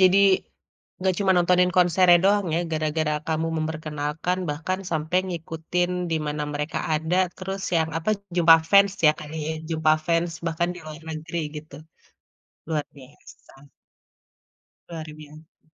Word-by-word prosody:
jadi, 185 +1 +6 0.9
gak 185 -1 +2
cuma 195 -2 +3
nontonin 180 +1 +3
konsernya 175 0 +5
doang 200 -1 +3
ya - - +1
gara-gara 155 0 0
kamu 160 +1 0
memperkenalkan 155 +2 -3
bahkan 175 +6 -3
sampai 160 +3 0
ngikutin 170 +1 -2 0.2
di - - +2
mana 150 0 -2
mereka 150 +2 -3 0.2
ada 160 +4 0 0.2
terus 190 +1 -5
yang 160 0 +1
apa, 175 +6 -1 0.3
jumpa 165 -2 +8
fans 200 -1 +6
ya 150 - +7
tadi 155 +1 -5
jumpa 160 -1 +2
fans, 170 0 +1
bahkan 165 +1 0
di 180 - -10
luar 155 +1 -9
negeri 160 +2 -4 0.2
gitu. 150 -2 -10 0.9
Luar 155 -2 0 0.2
biasa. 135 +1 -17 1.2
Luar 160 -2 -7
biasa. 155 +1 -14
160 Hz, 135 wpm, -24 LUFS, 155-180 Hz, 1.2 s, jumpa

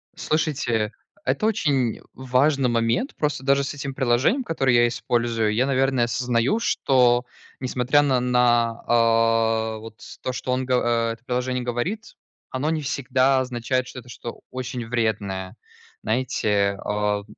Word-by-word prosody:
Слушайте, 145 -10 -1 0.3
это 215 - 0
очень 140 - +1
важный 130 +1 +1
момент. 115 - 0
Просто 150 -3 -2
даже 140 0 +3
с 140 - -4
этим 140 -1 -5
приложением, 130 - +2
которое 135 - +1
я 120 0 +5
использую, 115 -2 0
я, 125 +4 +2
наверное, 135 -2 +2
осознаю, 125 - 0
что, 125 - +2 0.3
несмотря 130 +2 +2
на 135 -3 +2
на 120 -2 +2
а, 115 -1 +2
вот 110 +1 -12 0.2
то, 130 - -3
что 125 - -3
он 130 0 0
го 125 - +1
а, 115 -1 +1
это 115 +1 -15
приложение 125 0 -1
говорит, 140 - -3 0.3
оно 135 +4 -2
не 160 -1 -1
всегда 135 -1 +1
означает, 125 0 -1
что 130 - -8
это 125 0 -15
что 120 -1 -8
очень 125 -2 -5
вредное, 105 -4 -2 0.5
знаете, 105 -4 0
а 105 0 -1
125 Hz, 140 wpm, -23 LUFS, 115-135 Hz, 0.5 s, я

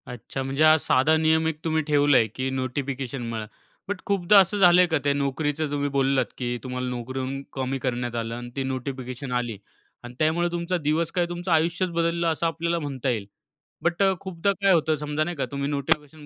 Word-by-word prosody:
अच्छा 125 +2 -6
म्हणजे 135 +3 0
हा 155 0 +7
साधा 145 +1 +3
नियम 160 0 +2
एक 155 -2 -3
तुम्ही 160 -1 +1
ठेवला 145 -2 +4
आहे 115 - +3
की 130 0 -2
नोटिफिकेशन 130 0 -3
म्हणा. 110 -2 -4 0.4
बट 195 -1 -4
खूपदा 200 -1 +5
असं 195 +2 +3
झालं 180 -2 +7
आहे 180 - +4
का 160 -2 +1
त्या 140 0 +2
नोकरीचं 145 +2 -1
तुम्ही 145 0 -1
बोललात 135 -2 +2
की 120 -1 -2
तुम्हाला 125 -1 -3
नोकरीहून 130 +2 -4
कमी 135 0 -2
करण्यात 120 -1 -2
आलं 115 0 -3
आणि 120 0 -7
ती 135 - -1
नोटिफिकेशन 130 0 -5
आली 120 -3 -2 0.5
आणि 120 0 -9
त्यामुळे 160 +3 +2
तुमचा 175 +1 -1
दिवस 160 +1 0
काय 175 -2 +1
तुमचं 175 +1 -4
आयुष्यच 170 +3 +2
बदललं 170 0 0
असं 165 +1 +1
आपल्याला 170 +1 -1
म्हणता 135 -4 -3
येईल. 110 -5 -1 0.6
बट 170 +3 +1
अ, 195 -1 +4
खूपदा 190 +1 -1
काय 195 -1 +4
होतं 160 -2 +2
समजा 150 +1 -2
नाही 175 +2 -4
का 140 - 0
तुम्ही 140 0 -2
नोटिफिकेशन 150 +1 0
145 Hz, 200 wpm, -25 LUFS, 130-170 Hz, 0.6 s, हा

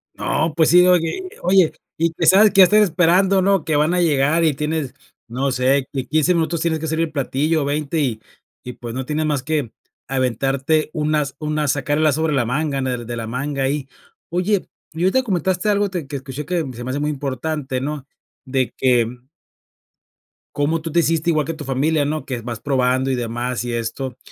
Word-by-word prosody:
No, 160 +1 -1
pues 160 -2 +3
sí, 180 +1 +7
oye, 170 - +2
eh, - - -16
oye 185 -3 +4 0.3
y, 165 0 +1
que - - -1
sabes 205 +2 +7
qué 200 - +2
ya - - +11
estás 210 +3 +4
esperando, 185 +2 +3
¿no?, 195 -1 +2
que 155 - 0
van 150 +4 +2
a 180 - +2
llegar 155 0 +2
y 155 - +3
tienes 150 -2 -3 0.4
no 135 +4 -1
sé, 130 +2 +1
que 135 - -2
en 125 - -11
15 155 +5 +2
minutos 165 -1 0
tienes 160 -2 0
que 160 - -4
servir 160 +1 0
el 155 - -14
platillo, 150 +2 0
o - - -3
20, 150 +2 -1
y 120 -6 -1 0.4
y, 125 - -7
pues, 120 -1 -8
no 130 0 -4
tienes 155 +2 -1
más 145 -4 -1
que 145 -6 -2 0.4
aventarte 135 +4 0
un 155 0 0
as 145 -3 -1
un 155 0 -2
as 150 -2 +2
sacar 145 +1 -1
el 155 - +2
as 150 - +3
sobre 160 0 0
la 130 -4 +1
manga, 140 +4 -1
en 130 - -1
el 125 -2 -3
de 120 - -5
la 115 - -4
manga, 135 +4 -3
ahí. 135 0 -1 0.4
Oye, 180 +3 0 0.3
y 165 - -3
ahorita 255 +8 +3
comentaste 185 -1 0
algo 205 0 +2
te 175 -6 -4
que 140 0 -4
escuché 135 +2 -7
que 175 -1 -1
se 120 - -8
me 125 - -5
hace 140 - -2
muy 150 - -1
importante, 140 0 -3
¿no? 145 -1 -4 0.4
De 130 -1 -1
que 125 -3 +3 1.5
cómo 155 +3 0
tú 160 - -5
te 170 - +3
hiciste 165 +1 +1
igual 155 -3 +1
que 165 - -3
tu 155 -1 -8
familia, 145 +3 +1
¿no? 150 -1 -3
Que 125 -3 -4
vas 115 -1 -6
probando 130 -1 +1
y - - +1
demás 120 +1 -3
y 120 -1 -4
esto, 120 +2 -4
150 Hz, 220 wpm, -20 LUFS, 130-165 Hz, 1.5 s, ya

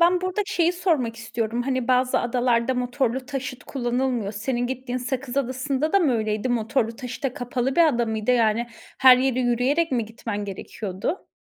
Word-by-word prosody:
ben 350 +1 +5
burada 370 +2 -1
şeyi 345 -3 +2
sormak 315 -11 0
istiyorum, 230 +1 -2
hani, 260 -1 -1
bazı 255 0 +3
adalarda 240 0 +1
motorlu 250 0 -1
taşıt 260 -3 -5
kullanılmıyor, 245 -4 -1
senin 240 +4 -2
gittiğin 255 0 -3
Sakız 260 +1 -4
Adası'nda 275 +3 -1
da 395 - +6
mı 300 -8 +2
öyleydi, 215 +1 -1
motorlu 230 0 0
taşıta 250 0 -4
kapalı 245 +2 -2
bir 335 -1 +7
adamıydı, 235 -4 0
yani, 230 -1 +2 0.3
her 260 -1 +8
yere 255 0 +1
yürüyerek 260 +6 +1
mi 235 -3 +1
gitmen 215 -2 -5
gerekiyordu? 200 - -5
250 Hz, 160 wpm, -24 LUFS, 235-265 Hz, 0.3 s, her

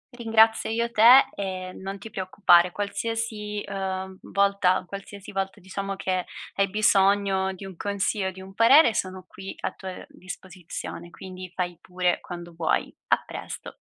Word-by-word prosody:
Ringrazio 225 -1 +3
io 235 +1 -1
te 240 +5 +8
e 185 -2 -4
non 195 +1 -6
ti 220 +3 -10
preoccupare, 180 -2 +4
qualsiasi, 210 +1 -3
uhm 190 -1 -3
volta 200 -2 +2
qualsiasi 200 0 -9
volta, 195 -1 -3
diciamo 195 +2 -5
che 185 -1 -1 0.3
hai 195 0 +2
bisogno 195 -1 +3
di 190 +1 -9
un 190 -1 -9
consiglio 200 +1 -1
o - - -2
di 190 0 -11
un 190 +1 -11
parere 235 +5 +6
sono 185 -2 -3
qui 195 0 -9
a - - -1
tua 185 -1 -8
disposizione, 180 -2 -8
quindi 185 0 -9
fai 175 -2 -2
pure, 180 -1 0
quando 175 -1 -8
vuoi, 165 -1 0
a - - +2
presto. - - -8
195 Hz, 150 wpm, -26 LUFS, 185-205 Hz, 0.3 s, te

